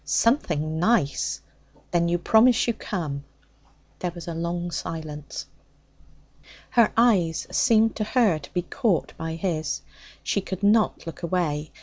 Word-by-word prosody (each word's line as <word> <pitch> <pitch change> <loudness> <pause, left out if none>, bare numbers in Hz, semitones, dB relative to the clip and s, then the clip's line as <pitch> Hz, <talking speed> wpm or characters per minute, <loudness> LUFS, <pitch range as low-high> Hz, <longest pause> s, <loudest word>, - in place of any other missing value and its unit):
'Something 155 - +1
nice. 145 - +1 0.5
Then 170 -1 +2
you 175 +1 +1
promise 225 +7 +4
to 235 - +1
come?' 155 -10 -4 0.8
There 180 - -1
was 175 0 -9
a 170 - -3
long 170 +1 -3
silence. 155 -3 -5 1.3
Her 235 -3 +4
eyes 190 -9 +3
seemed 225 -3 +3
to 215 - 0
her 215 -7 +2
to - - -13
be 180 - -1
caught 220 - -1
by 160 0 -4
his. 160 -4 -2 0.4
She 200 - 0
could 190 +1 -6
not 215 +2 +3
look 165 0 -8
away. 160 -4 -1
175 Hz, 135 wpm, -25 LUFS, 160-215 Hz, 1.3 s, promise